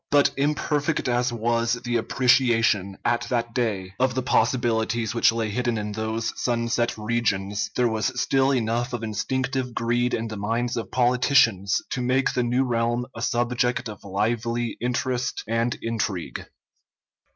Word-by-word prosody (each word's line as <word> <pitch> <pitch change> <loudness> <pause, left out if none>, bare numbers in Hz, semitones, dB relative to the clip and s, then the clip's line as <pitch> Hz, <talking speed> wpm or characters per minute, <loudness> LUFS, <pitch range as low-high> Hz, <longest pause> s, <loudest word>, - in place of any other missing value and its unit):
But 145 -1 +4
imperfect 145 0 0
as 120 0 +1
was 115 0 0
the 120 -1 0
appreciation, 115 -5 +2
at 120 0 +1
that 120 -2 -1
day, 100 -6 -2
of 130 -1 +2
the 130 - -1
possibilities 115 -3 +1
which 115 - +4
lay 115 -2 -2
hidden 120 +1 -1
in 105 0 -3
those 110 +2 -2
sunset 120 -1 0
regions, 105 -3 -1
there 125 -1 +3
was 110 +3 -1
still 135 0 +2
enough 120 0 0
of 120 -2 -3
instinctive 125 +3 -2
greed 120 +1 +1
in 115 0 -3
the 110 -1 -6
minds 115 +4 -1
of 115 - -4
politicians 120 -5 +3
to 125 - -2
make 130 +2 +1
the 125 - +1
new 125 +2 +1
realm 120 -1 0
a 115 - -6
subject 120 +1 0
of 105 -2 -9
lively 115 +4 -1
interest 125 +1 -1
and 115 +1 0
intrigue. 105 -6 -3
120 Hz, 150 wpm, -24 LUFS, 110-125 Hz, -, But